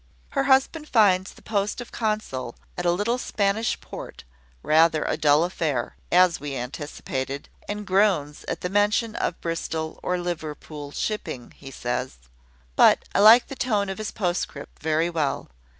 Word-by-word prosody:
Her 275 Hz, -1 st, 0 dB
husband 275 Hz, +3 st, +2 dB
finds 195 Hz, -5 st, +4 dB
the -, -, -18 dB
post 205 Hz, 0 st, -1 dB
of 245 Hz, -, -8 dB
consul 210 Hz, -, -2 dB, 0.2 s
at 180 Hz, 0 st, -2 dB
a -, -, +5 dB
little 210 Hz, +7 st, 0 dB
Spanish 210 Hz, 0 st, 0 dB
port -, -, -9 dB, 0.4 s
rather 160 Hz, 0 st, +4 dB
a -, -, 0 dB
dull 150 Hz, +1 st, +4 dB
affair, 155 Hz, -8 st, -2 dB, 0.2 s
as 180 Hz, -1 st, +5 dB
we 145 Hz, -1 st, -5 dB
anticipated, 135 Hz, +1 st, -5 dB, 0.2 s
and 210 Hz, 0 st, -4 dB
groans 185 Hz, -7 st, +2 dB
at -, -, -4 dB
the 180 Hz, -, -2 dB
mention 210 Hz, +3 st, +2 dB
of 170 Hz, -, -2 dB
Bristol 160 Hz, -1 st, -3 dB
or 180 Hz, -, 0 dB
Liverpool 155 Hz, -4 st, -5 dB
shipping, 145 Hz, -, -4 dB
he 135 Hz, -, -12 dB
says. 125 Hz, 0 st, -3 dB, 0.6 s
But -, -, +5 dB
I -, -, +2 dB
like 220 Hz, +4 st, +8 dB
the 275 Hz, -, -8 dB
tone 215 Hz, -7 st, 0 dB
of 195 Hz, -, -5 dB
his 215 Hz, -, -3 dB
postscript 175 Hz, -7 st, -3 dB
very 160 Hz, +2 st, +1 dB
well. 150 Hz, -5 st, -1 dB
175 Hz, 155 wpm, -25 LUFS, 150-210 Hz, 0.6 s, like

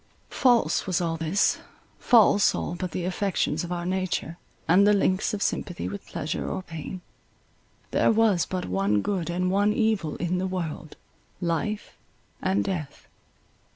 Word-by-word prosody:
False 245 Hz, -5 st, +2 dB
was 185 Hz, -3 st, +1 dB
all 165 Hz, -2 st, -1 dB
this—false 200 Hz, +5 st, +2 dB
all -, -, -3 dB
but 180 Hz, +1 st, -4 dB
the 175 Hz, +1 st, -4 dB
affections 180 Hz, -4 st, -1 dB
of 175 Hz, -, -6 dB
our 175 Hz, -1 st, -3 dB
nature, 185 Hz, -2 st, -2 dB, 0.3 s
and 190 Hz, +5 st, +5 dB
the 210 Hz, -, +6 dB
links 190 Hz, -1 st, +1 dB
of 205 Hz, -1 st, -2 dB
sympathy 175 Hz, -3 st, -2 dB
with 200 Hz, -1 st, -7 dB
pleasure 155 Hz, +3 st, -3 dB
or 185 Hz, -, -4 dB
pain. 170 Hz, +2 st, -7 dB, 0.9 s
There -, -, +3 dB
was 215 Hz, -5 st, +3 dB
but 185 Hz, -1 st, -3 dB
one 100 Hz, +3 st, +1 dB
good 185 Hz, -5 st, -2 dB
and 180 Hz, +1 st, 0 dB
one 205 Hz, +2 st, +3 dB
evil 215 Hz, -9 st, 0 dB
in 180 Hz, +1 st, -1 dB
the 190 Hz, -, -1 dB
world—life 175 Hz, +3 st, -5 dB, 0.5 s
and 190 Hz, +1 st, +1 dB
death. 170 Hz, -8 st, -5 dB
185 Hz, 145 wpm, -26 LUFS, 170-200 Hz, 0.9 s, the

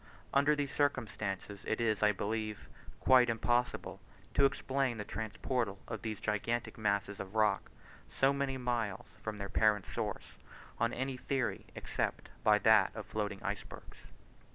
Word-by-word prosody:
Under 145 Hz, +2 st, +5 dB
these 145 Hz, -1 st, -2 dB
circumstances 105 Hz, -8 st, -1 dB
it 110 Hz, -, 0 dB
is, 110 Hz, -3 st, +1 dB
I 105 Hz, 0 st, +6 dB
believe, 110 Hz, +1 st, -3 dB, 0.3 s
quite 125 Hz, -2 st, +6 dB
impossible 120 Hz, +2 st, 0 dB, 0.3 s
to 140 Hz, -, +5 dB
explain 135 Hz, -2 st, 0 dB
the 105 Hz, -, -4 dB
transportal 110 Hz, +1 st, -2 dB
of -, -, -5 dB
these 110 Hz, -2 st, -4 dB
gigantic 110 Hz, +3 st, -1 dB
masses 100 Hz, -2 st, 0 dB
of 100 Hz, +2 st, -7 dB
rock 105 Hz, -2 st, +2 dB, 0.4 s
so 135 Hz, +1 st, +3 dB
many 140 Hz, -1 st, -1 dB
miles 120 Hz, -6 st, -1 dB, 0.2 s
from 110 Hz, -1 st, -4 dB
their 100 Hz, -1 st, -4 dB
parent 105 Hz, -1 st, +3 dB
source, -, -, -4 dB, 0.4 s
on 115 Hz, +1 st, +2 dB
any 130 Hz, +1 st, -2 dB
theory 135 Hz, 0 st, -2 dB
except -, -, -2 dB
by 105 Hz, -1 st, +6 dB
that 105 Hz, -2 st, +5 dB
of 110 Hz, -2 st, -5 dB
floating 105 Hz, -2 st, -3 dB
icebergs. -, -, -6 dB
110 Hz, 145 wpm, -34 LUFS, 105-130 Hz, 0.4 s, I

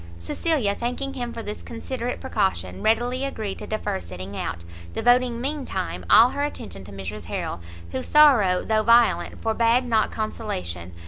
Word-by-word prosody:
Cecilia, 210 Hz, -, 0 dB
thanking 250 Hz, +5 st, -3 dB
him 245 Hz, -3 st, -4 dB
for 230 Hz, -1 st, -6 dB
this 210 Hz, 0 st, -6 dB
considerate 245 Hz, +1 st, -5 dB
precaution, 95 Hz, -, -1 dB
readily 240 Hz, +4 st, +1 dB
agreed 220 Hz, -8 st, -4 dB
to -, -, -7 dB
defer 210 Hz, -2 st, -2 dB
setting 95 Hz, -, -8 dB
out; 85 Hz, -3 st, -4 dB, 0.3 s
devoting, 245 Hz, 0 st, +3 dB
mean 285 Hz, +3 st, -2 dB
time, 90 Hz, -, -4 dB
all 235 Hz, +2 st, +8 dB
her 285 Hz, -, -2 dB
attention 100 Hz, -, -5 dB
to 100 Hz, -, -11 dB
Mrs 100 Hz, +1 st, -7 dB
Harrel, 85 Hz, -, -4 dB, 0.3 s
whose 130 Hz, -, -4 dB
sorrow, 245 Hz, -12 st, +5 dB
though 220 Hz, -1 st, +2 dB
violent, 235 Hz, +2 st, +3 dB
forbad 230 Hz, +2 st, +2 dB
not 225 Hz, -3 st, +2 dB
consolation. 90 Hz, -, -4 dB
225 Hz, 155 wpm, -24 LUFS, -, 0.3 s, all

